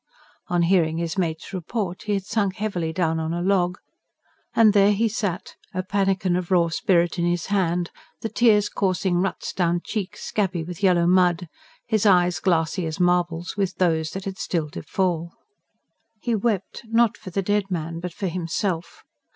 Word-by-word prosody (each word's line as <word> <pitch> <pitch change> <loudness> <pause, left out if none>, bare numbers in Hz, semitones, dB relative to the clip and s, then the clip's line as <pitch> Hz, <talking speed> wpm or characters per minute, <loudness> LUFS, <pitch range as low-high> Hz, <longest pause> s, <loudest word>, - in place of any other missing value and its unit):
On 175 -1 +1
hearing 165 -3 +2
his 170 +1 -2
mate's 165 -2 -2
report 185 0 -3
he 210 -1 +1
had 195 -1 -3
sunk 200 -2 0
heavily 180 -6 -2
down 160 -1 0
on 160 +1 -2
a 175 - -2
log, 180 -2 +2 0.8
and 220 -2 +6
there 205 0 +5
he 225 +3 +2
sat, 205 -5 -3 0.2
a 185 - -1
pannikin 195 -2 +1
of 180 -1 -2
raw 175 -3 +3
spirit 175 -3 +1
in 170 - +1
his 175 -1 0
hand, 175 -3 +1 0.3
the - - -2
tears 215 -3 +3
coursing 185 -2 0
ruts 190 +2 -2
down 175 -1 +1
cheeks 205 -4 -4
scabby 190 -5 -1
with 175 +2 -8
yellow 180 -3 +4
mud, 180 -1 +3 0.4
his 220 -2 +2
eyes 180 -2 +4
glassy 170 0 +1
as 160 +3 -5
marbles 175 -1 +1
with 195 -3 -1
those 160 -3 +1
that 190 0 -5
had 195 -1 -5
still 155 -4 -2
to 180 - -6
fall. 170 -3 -1 0.9
He 235 +2 -1
wept, 210 -3 -1
not 230 0 +3
for 205 - -10
the 195 +2 -1
dead 205 0 0
man, 165 -2 -3
but 180 +1 -5
for 195 - -5
himself. 175 0 -3
180 Hz, 175 wpm, -24 LUFS, 170-200 Hz, 0.9 s, and